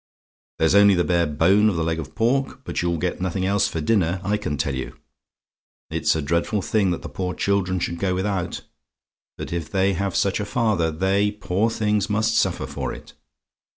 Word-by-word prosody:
"There's 80 +1 +2
only 100 -1 +6
the 85 - +2
bare 85 -2 +1
bone 95 +8 +3
of 100 - -2
the 80 - 0
leg 80 0 -1
of 75 - -8
pork! 130 +3 0
but - - -3
you'll 85 -1 0
get 90 +2 -2
nothing 95 0 -1
else 100 +1 +2
for 80 - -4
dinner, 90 0 +1
I 100 +2 +1
can 90 -8 -3
tell 70 -1 -1
you. 65 0 -5 0.9
It's - - +1
a 80 - -2
dreadful 85 +7 0
thing 100 +4 +1
that 85 - -3
the - - -5
poor 90 -1 -4
children 95 -2 0
should 85 0 -3
go 95 -1 0
without, 95 -2 -2 0.8
but - - -6
if 85 -3 -3
they 95 0 +1
have 100 +1 -2
such 100 0 +1
a 105 - -2
father, 105 -7 +1
they, 95 +5 +1
poor 105 +1 -1
things, 105 -2 0
must 110 +2 +1
suffer - - +1
for - - -4
it. - - -11
95 Hz, 200 wpm, -23 LUFS, 85-105 Hz, 0.9 s, only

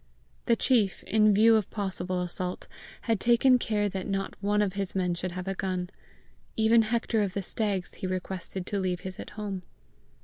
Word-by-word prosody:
The 235 - +5
chief, 225 -6 +2
in 215 0 +4
view 220 +3 +6
of 215 -3 +1
possible 185 -3 -2
assault, 180 +1 -3 0.3
had 225 -4 0
taken 245 +3 +5
care 210 -3 0
that 190 -1 -4
not 195 -1 -2
one 205 +1 +2
of 195 -3 -1
his 195 -1 -3
men 180 -2 +1
should 175 +1 -4
have 185 +1 -5
a 195 - 0
gun. 185 -1 -3 0.6
Even 225 +1 +5
Hector 225 0 0
of 195 -2 -2
the 200 - -1
Stags 200 -2 -2
he 185 - -5
requested 185 0 -4
to 200 - -1
leave 180 -2 -1
his 185 0 -7
at - - -7
home. 200 -3 -4
195 Hz, 190 wpm, -28 LUFS, 185-215 Hz, 0.6 s, view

